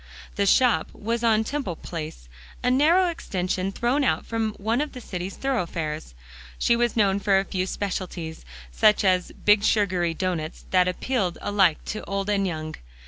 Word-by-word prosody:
The 200 0 0
shop 250 +4 +4
was 230 +2 -2
on 220 -1 +4
Temple 265 - -3
Place, 155 - -7 0.4
a 250 - +3
narrow 320 +8 +4
extension 190 - -2
thrown 245 +7 +1
out - - +1
from 225 -2 -1
one 225 +6 -1
of 300 - -3
the 255 - -7
city's 185 -4 -5
thoroughfares. 165 - -3 0.4
She 235 - +3
was 240 -1 0
known 200 -2 +3
for 200 -1 +3
a 195 - +1
few 185 -1 -2
specialties; 180 -5 -4 0.3
such 210 - +4
as 185 -1 +2
big 210 0 +3
sugary 180 -6 +1
doughnuts 170 -3 -3
that 185 -1 +4
appealed 185 0 -1
alike 195 -6 +2
to 215 - -4
old 195 +1 -2
and 195 -1 +1
young. 155 -2 -4
195 Hz, 165 wpm, -25 LUFS, 180-230 Hz, 0.4 s, shop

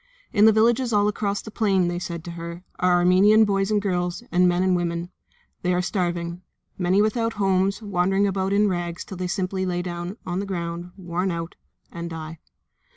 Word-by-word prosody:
"In 210 -1 +5
the 220 - +8
villages 235 +3 +3
all 205 -1 +3
across 205 -1 -1
the 220 - -9
plain," 195 -5 +2
they 175 0 -2
said 170 -2 -5
to 175 - -7
her, 170 +1 -7 0.2
"are 180 0 +3
Armenian 185 +5 +5
boys 195 -1 0
and 210 -1 +2
girls, 180 0 -2
and 180 +1 +4
men 175 +1 +1
and 185 -1 +3
women. 170 0 -2 0.5
They 180 0 +1
are 180 - +1
starving. 175 -2 -2 0.3
Many 185 +2 +2
are - - +5
without 225 +1 0
homes, 195 +1 +1
wandering 195 0 +1
about 190 -1 0
in 205 +1 +3
rags 175 -2 -3
till 190 - -8
they 180 0 -2
simply 190 0 -2
lie 175 -1 -1
down 175 +3 -5
on 180 +1 -2
the 200 - -4
ground, 170 -1 -4
worn 180 0 -2
out, 170 -1 -4 0.4
and 170 0 -6
die." 160 -1 -7
185 Hz, 200 wpm, -24 LUFS, 175-200 Hz, 0.5 s, the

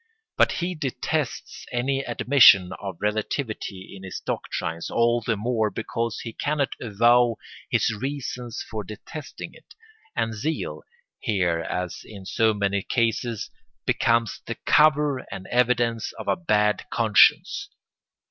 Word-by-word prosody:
But - - +4
he 180 +1 -2
detests 145 -1 -3
any 130 +3 0
admission 120 -7 +6
of 95 -4 -5
relativity 105 -2 -3
in 95 - -11
his 95 -1 -6
doctrines, 80 +1 -4
all 120 0 +2
the 115 -1 -1
more 110 0 0
because 115 +1 -3
he 115 - -7
cannot 145 +1 -1
avow 120 +2 +4 0.3
his - - +2
reasons 125 -1 -4
for 110 -2 -4
detesting 110 +9 -8
it; - - -18 0.4
and 115 0 0
zeal, 150 +10 -3 0.4
here 90 -6 +1
as 90 +1 -4
in 100 -3 -11
so 110 +3 +2
many 100 -1 0
cases, 115 0 -1 0.3
becomes 115 -2 +1
the - - -3
cover 150 -2 +4
and 95 - -6
evidence 120 -2 +1
of - - -9
a - - +3
bad 105 - +1
conscience. 160 - +4
115 Hz, 130 wpm, -25 LUFS, 105-130 Hz, 0.4 s, admission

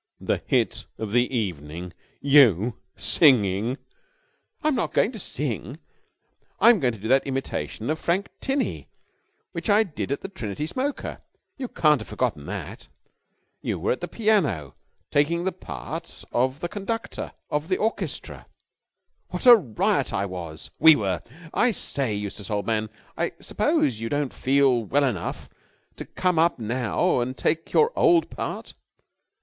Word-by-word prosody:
"The - - -1
hit - - +1
of 110 -2 -4
the 120 +3 +2
evening! 90 - -4 0.3
You! 125 - +5 0.2
Singing!" 115 - +3 0.9
"I'm 305 0 +3
not 240 - -1
going 220 - +3
to 225 - -8
sing. 130 - -4 0.8
I'm 235 -3 +7
going 125 -6 +1
to - - -13
do 110 - -5
that 135 +3 +3
imitation 135 0 -3
of 155 - -2
Frank 185 +4 0
Tinney 270 0 -2 0.6
which - - -5
I 210 +2 +6
did 155 -8 -5
at 140 - -1
the - - -5
Trinity 150 - -5
Smoker. 265 - -3 0.4
You 260 -3 -5
haven't 150 -3 +3
forgotten 75 0 -2
that? - - -6 0.7
You - - -2
were - - 0
at 125 - -2
the 175 - -3
piano 180 - +1 0.4
taking 165 +4 +2
the 190 - 0
part 70 - -7
of 130 +5 0
the 175 - -1
conductor 210 +4 -4 0.2
of 150 +1 -1
the 185 - +1
orchestra. 220 +2 -3 0.8
What - - -5
a 245 -1 +11
riot 130 - 0
I 100 - 0
was 85 -4 -7
we 160 -1 +9
were! 100 -6 -1 0.3
I 245 - +3
say, 135 - 0
Eustace, 100 -1 -6
old 105 -2 -1
man, 110 -1 0 0.3
I - - -1
suppose 115 -5 +1
you 115 0 -3
don't 145 -2 -1
feel 135 -3 +3
well 140 +7 +2
enough 115 -11 -2 0.5
to - - -6
come 180 -3 0
up 170 +1 +3
now 120 +2 0
and 130 +2 -2
take 160 +1 -1
your 455 +1 +4
old 340 -2 +4
part? - - -5
135 Hz, 150 wpm, -25 LUFS, 110-180 Hz, 0.9 s, a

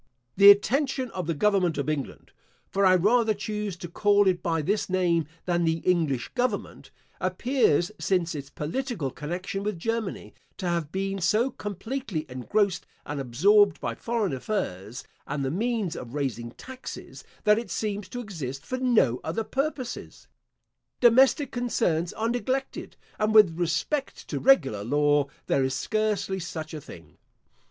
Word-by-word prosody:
The 200 +1 +9
attention 260 +5 +3
of 185 -3 -4
the 165 - 0
government 185 -1 +2
of 140 -1 -2
England 150 -3 -4 0.4
(for 195 0 +3
I 185 - +6
rather 220 +4 +3
choose 210 -2 -4
to 175 - -7
call 205 +3 +3
it 180 -2 +2
by 165 -4 0
this 205 +6 0
name 175 -4 +1 0.2
than 175 -1 +1
the 165 0 +2
English 160 -8 +1
government) 250 0 -2 0.3
appears, 185 - +1
since 180 -3 0
its 140 -2 -6
political 165 - -3
connection 180 +7 -4
with 205 -2 -2
Germany, 225 +2 -3 0.2
to 185 - -3
have 170 -3 -1
been 195 +1 -2
so 220 +10 +2
completely 205 - -4
engrossed 180 - 0 0.2
and 145 -1 -4
absorbed 195 - +4
by - - -3
foreign 230 -8 -2
affairs, 125 - -4 0.2
and 140 -1 -2
the 135 - -1
means 215 -1 -1
of 125 +2 -8
raising 125 -5 -2
taxes, 260 0 -9 0.2
that 210 0 +5
it 235 - -7
seems 205 -2 -3
to 245 - -5
exist 145 - -6
for 255 - -3
no 220 - +3
other 170 +8 -2
purposes. 270 0 -4 0.7
Domestic 260 +3 +5
concerns 180 -9 0
are 225 +1 -1
neglected; 260 +3 -3 0.2
and 215 +1 +1
with 200 -7 +7
respect 175 - -2
to - - -2
regular 185 - +3
law, 145 +3 +2 0.2
there 135 - +2
is 130 0 -1
scarcely 205 0 -1
such 160 -3 -6
a 155 - -6
thing. - - -14
190 Hz, 150 wpm, -26 LUFS, 160-220 Hz, 0.7 s, The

